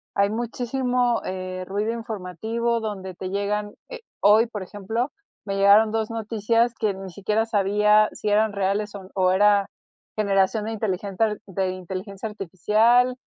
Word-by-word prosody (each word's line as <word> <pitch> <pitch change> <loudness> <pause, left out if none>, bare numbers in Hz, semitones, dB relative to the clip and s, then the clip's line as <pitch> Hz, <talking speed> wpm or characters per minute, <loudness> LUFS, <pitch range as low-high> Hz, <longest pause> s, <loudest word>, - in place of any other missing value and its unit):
hay 200 0 +3
muchísimo, 245 +2 -1
eh, 185 0 -5
ruido 205 +3 -1
informativo 225 +2 -3
donde 190 -4 -5
te 185 +1 -5
llegan, 205 +1 -2 0.2
eh, - - -8 0.2
hoy, 210 +3 +6
por 215 -3 -6
ejemplo, 215 +7 -3 0.4
me 195 - -2
llegaron 200 +2 +6
2 220 0 -1
noticias 230 +1 0
que 215 -2 0
ni 190 0 -8
siquiera 210 +4 0
sabía 210 0 +3
si 210 - -3
eran 215 +1 +2
reales 200 +1 -1
o 190 -2 -9
o 185 -1 +3
era 200 +1 +4 0.5
generación 200 +1 +1
de 220 - -3
inteligencia 210 0 -1
de 190 -1 -1
inteligencia 190 +3 -6
artificial, 215 +6 +2
210 Hz, 145 wpm, -24 LUFS, 195-225 Hz, 0.5 s, hoy